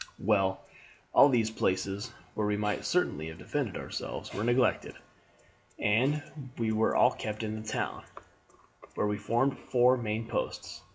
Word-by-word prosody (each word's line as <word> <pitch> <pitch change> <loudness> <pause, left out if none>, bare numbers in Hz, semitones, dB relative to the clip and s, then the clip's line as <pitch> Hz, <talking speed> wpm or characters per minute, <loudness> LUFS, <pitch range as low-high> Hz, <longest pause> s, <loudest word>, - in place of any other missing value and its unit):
"Well, 95 -2 +1 0.5
all 145 - +8
these 115 -4 +2
places, 100 +2 -1 0.2
where 105 -1 -1
we 105 0 +1
might 105 0 -1
certainly 80 - 0
have 80 0 -8
defended - - -3
ourselves, - - -5
were 105 - -2
neglected, 120 +2 +2 0.8
and 130 +8 +2 0.3
we 115 -2 0
were 110 0 +2
all - - +6
kept 105 +1 -5
in 110 0 -3
the 110 - -11
town, - - -3 0.9
where - - +1
we 105 0 0
formed 120 +6 +1
four 125 +1 +3
main 110 -1 -3
posts. - - -4
110 Hz, 150 wpm, -30 LUFS, 105-120 Hz, 0.9 s, all